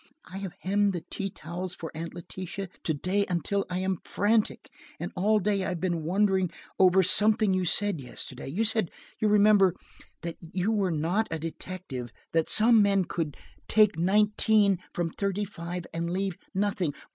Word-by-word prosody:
I 190 - -8
have 195 -3 -5
hemmed 200 -1 +1
tea 195 0 -3
towels 175 +2 -6
for 160 - -7
Aunt 165 +2 -6
Letitia 185 +2 -6 0.2
to 160 - +1
day 185 +7 0
until 185 +3 -1
I 180 - -2
am 190 -1 0
frantic, 210 +2 0 0.3
and - - -4
all 210 +4 +3
day 200 -1 +1
I - - -1
have 180 -2 -3
been 175 -2 -1
wondering 190 +2 +2 0.3
over 190 0 +6
something 210 +2 +3
you 185 -1 +1
said 195 -2 +1
yesterday. 125 - -7
You 180 +12 0
said, 220 -5 +2 0.3
you 215 - +2
remember, 205 -3 +5 0.5
that 170 -1 -4
you 180 +5 -2
were 200 -4 +1
not 175 +7 0
a 165 - -2
detective, 160 -5 -6 0.2
that 165 -1 +1
some 225 0 +6
men 200 -2 +3
could 160 -4 -3 0.3
take 215 -3 +4
nineteen 205 +1 +3
from 170 -2 -2
thirty 200 +2 -1
five 175 -2 -6
and 170 +1 -2
leave 190 +1 -1 0.2
nothing. 190 -6 0
190 Hz, 170 wpm, -28 LUFS, 170-205 Hz, 0.5 s, over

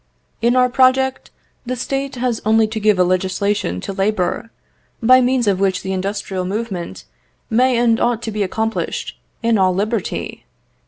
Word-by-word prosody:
"In 240 +2 +3
our 250 0 +5
project, 260 +1 +2 0.3
the 255 +1 -3
State 270 +2 -3
has 245 -2 -1
only 220 +1 +4
to 220 +1 -4
give 210 -2 +3
a 180 - +4
legislation 185 - 0
to 195 - -5
labour, 195 +1 -1 0.5
by 255 +2 +6
means 250 -1 +1
of 195 -2 +1
which 190 -1 0
the 190 - -3
industrial 190 0 -3
movement 195 -2 -4 0.5
may 250 +2 +3
and 235 -1 +3
ought 235 -1 0
to 225 - -3
be 210 0 -3
accomplished 220 +3 -2 0.3
in 230 -2 +2
all 185 -1 +3
liberty. 210 +1 -3
220 Hz, 160 wpm, -19 LUFS, 195-245 Hz, 0.5 s, by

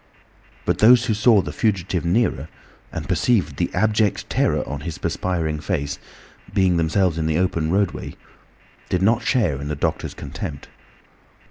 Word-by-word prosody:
But - - 0
those 120 +3 +6
who 115 - +1
saw 105 -1 +4
the - - -6
fugitive 95 -5 0
nearer, 85 - 0 0.4
and - - -5
perceived 90 - +1
the 85 - -1
abject 105 +1 +1
terror - - +1
on - - -4
his - - -5
perspiring 80 -4 -2
face, 75 -4 -3 0.5
being 95 -3 +2
themselves 85 +1 +1
in 80 - 0
the 80 0 +1
open 85 -3 0
roadway, 100 -1 -1 0.7
did 90 +1 0
not 115 +4 +3
share 85 - +1
in 70 - -5
the 75 - -2
doctor's - - -2
contempt. 70 -3 -7
90 Hz, 150 wpm, -22 LUFS, 80-105 Hz, 0.7 s, those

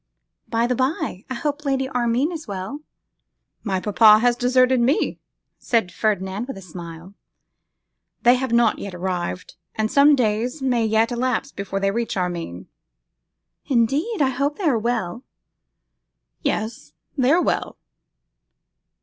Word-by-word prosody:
By 230 0 +1
the 250 - +1
bye, 260 - -2
I 260 - -3
hope 295 +4 -3
Lady 270 -2 0
Armine 250 +4 0
is 320 -2 -7
well?' 200 +8 -5 0.8
'My 195 -4 -1
papa 210 +2 +6
has 240 +2 +2
deserted 255 +1 +3
me,' 250 +5 +1 0.4
said 225 -7 0
Ferdinand 200 +2 -1
with 270 - -6
a - - -9
smile. 170 +1 -10 1.1
'They 245 - +7
have 255 -1 -1
not 235 -2 +3
yet 195 -3 -6
arrived, 180 0 -4 0.2
and 220 0 -1
some 285 +1 +6
days 240 +3 0
may 250 -4 +1
yet 220 +2 +2
elapse 255 +3 -1
before 195 0 -4
they 195 0 +1
reach 230 -1 -2
Armine.' 170 - -3 1.0
'Indeed! 280 - +1
I 265 - +2
hope 280 +3 -1
they 405 - -6
are 275 - +3
well.' 230 -1 -2 1.2
'Yes; 220 - -3 0.2
they 260 -3 +2
are 335 - +5
well. - - -1
235 Hz, 140 wpm, -22 LUFS, 195-265 Hz, 1.2 s, They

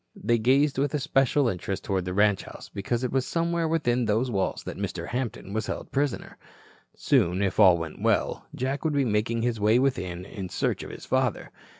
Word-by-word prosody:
They 115 +2 +1
gazed 135 +4 +3
with 145 +1 0
especial 135 0 +2
interest 95 -1 -3
toward 95 -2 -1
the 90 - -3
ranch 105 -1 +3
house, - - -11
because 115 +5 -2
it 125 - -1
was 130 -1 +1
somewhere 170 +2 0
within 125 -7 +1
those 115 +4 +1
walls 95 -3 -1
that - - -6
Mr. - - -4
Hampton 120 -5 -4
was 110 0 -2
held - - -5
prisoner. 140 -1 -2 0.6
Soon, 90 +2 +2
if 100 +1 -1
all 95 -4 +7
went 80 -2 -6
well, - - 0
Jack 135 +2 -2
would 155 -2 0
be 140 -2 +2
making 115 +1 0
his 120 -2 0
way 105 +3 +4
within 90 -9 -1
in 95 -2 -7
search - - -1
of - - -7
his - - -9
father. - - 0
115 Hz, 200 wpm, -26 LUFS, 100-135 Hz, 0.6 s, all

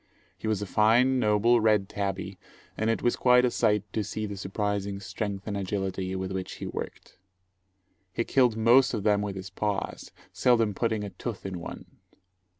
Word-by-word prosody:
He - - -6
was 105 -2 0
a - - -3
fine, 120 +6 +3
noble, 110 +2 +3
red 105 -3 +3
tabby, 95 -1 -4 0.4
and 110 +1 0
it 115 - 0
was 120 - +2
quite 125 0 +5
a 125 - +1
sight 105 -4 +2
to 110 - 0
see 110 +1 -4
the 100 -1 -5
surprising 100 0 -2
strength 100 0 -4
and 105 - -3
agility 95 -1 -2
with 95 0 -3
which 95 -1 -4
he - - -7
worked. - - -7 0.9
He 115 - -1
killed 125 -4 +2
most 120 +3 +5
of 105 - -3
them 105 -1 +3
with 100 -1 -3
his 95 -1 -7
paws, 100 0 -3 0.2
seldom 115 -4 +3
putting 110 0 -1
a 100 - -6
tooth 100 +4 -6
in 95 -2 -4
one. 85 - -8
105 Hz, 180 wpm, -27 LUFS, 95-115 Hz, 0.9 s, quite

